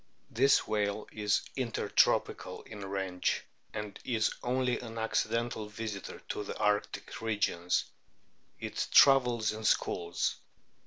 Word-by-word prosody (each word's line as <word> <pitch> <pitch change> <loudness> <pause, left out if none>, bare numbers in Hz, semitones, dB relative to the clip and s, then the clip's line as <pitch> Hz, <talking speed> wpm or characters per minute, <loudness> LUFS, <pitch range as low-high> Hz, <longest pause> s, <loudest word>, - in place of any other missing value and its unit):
This 135 +4 +4
whale 105 0 -1
is 105 -1 +1
intertropical 125 -4 +1
in 105 -2 -9
range,* 95 -2 -1 0.3
and 105 -2 -6
is 115 -3 +1
only 125 0 0
an 115 -2 -8
accidental 115 0 -1
visitor 105 -2 -6
to - - -2
the - - -6
arctic 105 +1 -1
regions. 100 -5 0 0.7
It - - -3
travels 125 -5 +6
in 110 +1 -6
"schools." 85 -4 +1
110 Hz, 110 wpm, -31 LUFS, 100-115 Hz, 0.7 s, travels